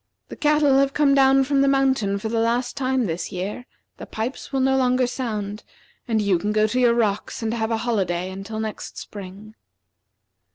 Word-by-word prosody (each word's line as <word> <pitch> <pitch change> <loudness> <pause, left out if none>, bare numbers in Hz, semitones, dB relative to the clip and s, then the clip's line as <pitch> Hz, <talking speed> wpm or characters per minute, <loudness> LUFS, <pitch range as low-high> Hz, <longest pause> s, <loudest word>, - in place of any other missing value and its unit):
The - - -7
cattle 295 -2 +3
have 275 0 +1
come 290 -2 +4
down 270 0 +5
from 275 +1 +1
the 275 - +3
mountain 265 -7 +2
for 215 +2 -4
the 225 +1 -1
last 240 +3 0
time 260 -2 0
this 165 0 -4
year, 200 +6 -5 0.3
the - - -9
pipes 230 +6 -5
will 270 - 0
no 265 0 +2
longer 255 -1 +2
sound, 215 -5 -4 0.5
and 225 -2 +1
you 200 -4 +2
can 205 +4 -2
go 215 0 +3
to 250 +4 -1
your 240 -2 +4
rocks 215 -1 -1
and 225 0 -1
have 220 -1 -1
a 225 - 0
holiday 185 -5 -1
until 195 +3 -6
next 220 -1 -6
spring." 200 +2 -9
230 Hz, 195 wpm, -23 LUFS, 205-265 Hz, 0.5 s, down